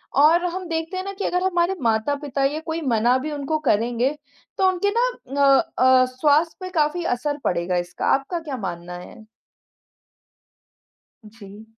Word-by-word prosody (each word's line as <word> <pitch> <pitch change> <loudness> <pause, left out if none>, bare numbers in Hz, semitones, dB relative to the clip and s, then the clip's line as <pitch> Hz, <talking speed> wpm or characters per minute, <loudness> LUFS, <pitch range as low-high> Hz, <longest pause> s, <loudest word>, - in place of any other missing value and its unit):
और 315 +5 +5
हम 365 +1 -3
देखते 325 +3 -3
हैं 370 - -3
ना 395 - -4
कि 395 - -4
अगर 360 0 0
हमारे 360 0 +1
माता-पिता 275 +5 0
या 285 +3 0
कोई 325 0 -3
मना 240 -2 +2
भी 305 - -3
उनको 295 +1 -2
करेंगे, 240 +5 +1 0.4
तो 380 - +3
उनके 375 +2 +1
ना - - +3 0.4
अ 275 -1 +6 0.2
अ, 255 0 +5
स्वास्थ्य 300 +5 +2
पे 370 - -5
काफ़ी 305 +4 +1
असर 290 +3 -3
पड़ेगा 175 0 0
इसका। 175 0 -4
आपका 280 +6 -3
क्या 300 -5 -6
मानना 175 -4 -6
है? 220 +5 -12 2.1
जी। 210 -1 -13
285 Hz, 160 wpm, -22 LUFS, 230-340 Hz, 2.1 s, अ